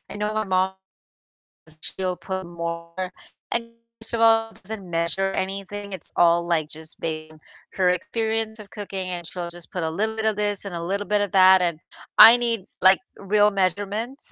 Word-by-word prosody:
know 210 +1 -2
my 215 0 -1
mom, 190 -1 0 1.1
she'll 185 -1 -1
put 190 +2 -6
more 170 +1 -6 0.4
and 230 0 -3 0.3
first 225 - +8
of 230 - -1
all, 225 0 +4
doesn't 195 -2 -5
measure 170 +3 +1
anything. 195 +2 -4
It's 185 -5 -4
all, 170 0 +3
like, 160 -3 0
just 155 +1 +1
based 155 -1 -5
on 155 - -19 0.3
her 185 -1 +2
experience 220 +4 -2
of 205 - -12
cooking, 195 -3 -6
and 175 -2 -5
she'll 175 -1 -5
just 175 0 -4
put 180 - -3
a 160 - -1
little 215 +7 -2
bit 220 - -3
of 220 -2 +1
this 205 -1 0
and 195 - -6
a 170 - -4
little 200 +4 -3
bit 210 0 +1
of 205 - -2
that, 190 -1 +7
and 170 -3 -1 0.4
I 230 +2 +10
need, 235 -3 -1 0.2
like, 185 +1 +6 0.2
real 210 +1 +2
measurements, 205 - -1
190 Hz, 185 wpm, -23 LUFS, 175-210 Hz, 1.1 s, I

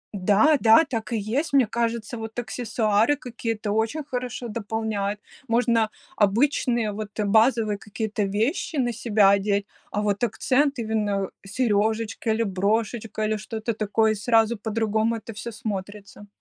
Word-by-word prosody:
Да, 210 +11 +4
да, 225 +8 +7
так 230 -3 -4
и 230 - 0
есть. 270 +9 -2
Мне 265 -4 +5
кажется, 230 +1 -2
вот 225 +1 -7
аксессуары 225 +1 +1
какие-то 230 -5 -4
очень 225 +8 0
хорошо 250 -2 -4
дополняют. 210 -2 -3 0.3
Можно 230 -1 +2 0.3
обычные, 235 +1 +2
вот, 210 0 -5
базовые 220 0 +3
какие-то 215 0 -4
вещи 220 - -1
на 245 -4 0
себя 210 -3 +3
одеть, 200 0 +1 0.3
а 210 - -1
вот 205 +2 -1
акцент- 275 +3 +1
именно 210 -3 -1
серёжечка 220 +1 0
или 225 +1 +2
брошечка, 215 +3 -1
или 215 0 0
что-то 220 +1 -4
такое, 215 +1 +1
и - - -1
сразу 225 +2 +2
по-другому 220 +1 0
это 225 0 -8
всё 225 +3 -6
смотрится. 205 -1 -7
220 Hz, 140 wpm, -24 LUFS, 210-235 Hz, 0.3 s, да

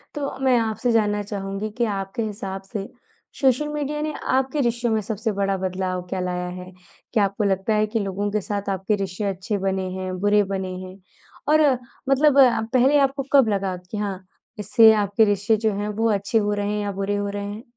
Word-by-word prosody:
तो 280 -2 -3
मैं 255 -2 +5
आपसे 225 +2 0
जानना 210 -2 +2
चाहूँगी 195 +1 -4
कि 240 - +2
आपके 195 +4 -3
हिसाब 195 -2 -5
से 200 -2 -3 0.5
सोशल 270 +2 +3
मीडिया 300 0 -2
ने 305 0 -2 0.2
आपके 265 +2 0
रिश्तों 235 0 -1
में 220 - +1
सबसे 215 +1 -2
बड़ा 195 0 +1
बदलाव 185 0 -2
क्या 190 - -2
लाया 180 0 -2
है? 185 - -11 0.4
क्या 215 - +3
आपको 200 +2 -2
लगता 195 +2 +1
है 215 0 +2
कि 225 +1 -1
लोगों 200 0 -2
के 210 0 0
साथ 200 +1 -3
आपके 195 +2 0
रिश्ते 195 0 -4
अच्छे 190 +3 -3
बने 190 -1 -1
हैं, 185 0 -4
बुरे 205 +1 +3
बने 190 -1 -3
हैं 185 +1 -11 0.6
और 310 - +5 0.5
मतलब 280 +1 +4 0.3
पहले 260 +3 +5
आपको 275 0 +1
कब 270 -5 +6
लगा 195 -2 -1
कि 180 +4 -8
हाँ, 200 -3 -3 0.4
इससे 220 +2 +6
आपके 205 +2 +3
रिश्ते 205 +2 +2
जो - - +3
हैं 205 +1 -2
वो 230 - +3
अच्छे 200 +2 0
हो 210 -1 +1
रहे 205 0 -1
हैं 210 - -1
या 205 - -2
बुरे 195 +1 -2
हो 205 0 -2
रहे 200 0 -4
हैं? 210 +3 -7
205 Hz, 205 wpm, -23 LUFS, 195-225 Hz, 0.6 s, कब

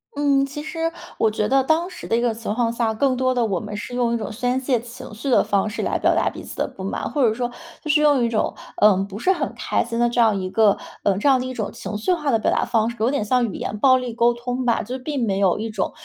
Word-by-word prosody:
嗯， 280 -1 +2
其 295 +2 -7
实 330 +1 -2 0.3
我 220 - +4
觉 210 0 -1
得 270 0 +3
当 320 +5 +1
时 - - -9
的 230 - +1
一 - - +1
个 240 -2 +1
情 225 -1 -5
况 235 -1 +1
下， 230 -2 0
更 260 +2 +1
多 255 0 +1
地 240 -2 +2
我 190 -5 -1
们 210 0 -7
是 245 - -7
用 240 -1 +1
一 - - +1
种 220 0 -5
宣 245 +3 -1
泄 255 -3 +1
情 245 0 -10
绪 250 +6 -5
的 - - +4
方 200 +1 0
式 220 - -4
来 - - -1
表 - - +3
达 - - +1
彼 - - -10
此 - - -9
的 - - -1
不 190 - -10
满， 195 - -3
或 290 - -1
者 215 - +2
说 245 0 -2 0.3
就 305 - -5
是 300 0 +4
用 290 -5 +4
一 230 - +1
种 220 - -1 0.2
呃 210 -2 +6
不 200 +2 -8
是 375 - +2
很 - - -2
开 - - -1
心 230 0 -4
的 240 0 +3
这 240 - -2
样 220 -4 +4
一 185 - -3
个 210 -1 +4 0.3
嗯 200 -1 +2
这 280 - +3
样 265 - +5
的 255 - -3
一 255 - -4
种 215 -4 -3
情 210 - -7
绪 220 - -1
化 300 -5 -1
的 225 - +3
表 - - +1
达 - - +1
方 225 -1 +1
式， 235 - -7
有 230 +4 +2
点 280 -7 0
像 245 +3 +2
语 - - -8
言 210 - -4
暴 255 +3 +5
力 250 -1 -4
沟 240 +1 +3
通 245 +1 -4
吧。 235 - +2
就 250 +5 -5
并 275 -1 -3
没 195 -2 0
有 195 -2 +3
一 225 +1 -3
种 205 -3 -2
240 Hz, 325 characters per minute, -22 LUFS, 215-260 Hz, 0.3 s, 呃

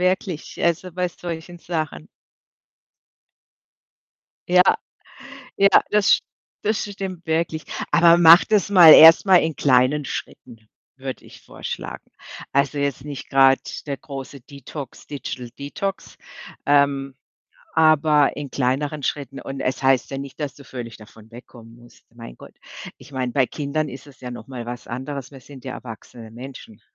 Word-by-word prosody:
wirklich, 185 -2 -2
also 170 +1 0
bei 180 0 -1
solchen 175 0 -8
Sachen. 155 - -5 2.4
Ja, 180 0 +6 0.9
ja, 200 - +5 0.2
das 210 -1 +3
st - - -22 0.4
das 215 +1 0
stimmt 190 -4 -7
wirklich. 160 -1 -1 0.3
Aber 170 0 +6
mache 170 +1 +8
das 210 -4 +2
mal 175 -5 +9
erst 160 +4 +9
mal 190 - +6
in 160 -4 +1
kleinen 135 +2 +2
Schritten, 115 -4 -8 0.3
würde 130 -1 -7
ich - - -15
vorschlagen. - - -7 0.5
Also, 140 +1 +1
jetzt 140 -2 -2
nicht 145 -3 -8
grade 135 0 +5 0.3
der 140 - -3
große 135 -1 -9
Detox 140 -1 -10
Digital 130 -3 -7
Detox, 190 +8 -5 0.5
ähm, 140 -1 +2 0.6
aber 155 -2 +3
in 145 -1 -6
kleineren 140 +3 -1
Schritten. 140 -1 -4
Und 135 0 -7
es 130 +1 -3
heißt 130 -2 +2
ja 135 - -4
nicht, 140 +2 -9
dass 145 -4 -4
du 140 - -14
völlig 120 -3 -8
davon 110 0 -16
wegkommen 115 -1 -14
musst, 120 0 -20
mein - - -11
Gott. - - -15 0.4
Ich - - -16
meine, 130 -2 -3
bei 135 -2 +3
Kindern 150 +2 -3
ist 135 +3 -11
es 135 -2 -18
ja 125 -1 -7
noch 120 - -10
mal 125 -3 -7
was 120 +1 -8
anderes, 130 +2 -6
wir 135 -2 -13
sind 135 -2 -14
ja 130 - -5
erwachsene 115 -1 -11
Menschen, 120 -3 -11
140 Hz, 150 wpm, -22 LUFS, 130-160 Hz, 2.4 s, mal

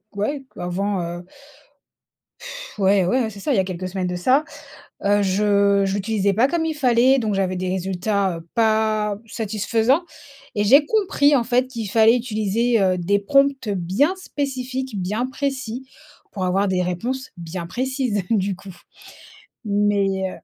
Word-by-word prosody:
ouais 270 +8 -2
avant, 190 +2 -2 0.2
heu - - -11 1.2
pff - - -10
ouais 195 -1 +3
ouais 190 +8 +1
hein, - - -3
c'est 205 -2 -11
ça, 280 - -1
il - - +2
y - - +4
a - - +3
quelques 185 -1 -5
semaines 185 -1 -2
de 180 - -3
ça, 255 +12 +3 0.6
heu, 205 +1 +3
je 200 0 +2
je 195 - -1
l'utilisais 205 -1 0
pas 230 +6 +3
comme 325 +3 -1
il 320 - -1
fallait, 260 -2 +3
donc 215 -4 -1
j'avais 190 -1 0
des 185 0 -2
résultats, 190 0 -1
heu, 165 0 -12
pas 215 -2 +1
satisfaisants 225 - 0 0.5
et 205 - +1
j'ai 275 +8 +6
compris 305 -7 +2
en 250 - +2
fait 250 +2 +1
qu'il 230 -5 -5
fallait 225 +3 +5
utiliser, 230 0 0
heu, 185 -1 +2
des 195 +3 +1
prompts 275 +2 +2
bien 195 - +1
spécifiques, 260 - -4
bien 210 +7 -1
précis, 260 -2 -4 0.4
pour 190 -2 -3
avoir 195 +3 +1
des 185 -1 +1
réponses 240 +10 -3
bien 170 +1 -6
précises, 255 -1 -1
du 200 -3 +1
coup. 190 0 -12 0.9
Mais, 200 -2 +1
210 Hz, 160 wpm, -22 LUFS, 190-255 Hz, 1.2 s, j'ai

